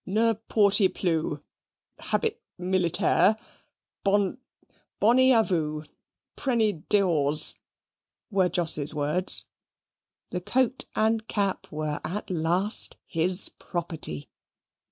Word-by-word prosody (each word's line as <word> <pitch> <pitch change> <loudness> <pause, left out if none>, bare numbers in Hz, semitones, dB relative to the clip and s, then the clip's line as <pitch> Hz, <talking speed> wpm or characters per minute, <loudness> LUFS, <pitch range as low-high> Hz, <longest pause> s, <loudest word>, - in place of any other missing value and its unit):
"Ne 225 +4 +1 0.2
porty 200 -2 +4
ploo 160 -4 -2 0.6
habit 455 0 -2 0.2
militair 180 +2 +2 0.7
bonn 200 +3 0 0.6
bonny 255 +4 +4
a 225 -3 +4
voo, 155 -6 -2 0.5
prenny 220 - -1
dehors" 155 -7 +2 0.8
were 190 -3 +2
Jos's 155 -4 +2
words 150 +5 +3 0.9
the 180 - -4
coat 255 +6 -1
and 220 0 0
cap 200 -2 -3
were 150 -1 -4
at 190 +5 -5
last 180 +5 +1
his 180 +3 +2
property. 160 - -4
185 Hz, 90 wpm, -26 LUFS, 160-215 Hz, 0.9 s, porty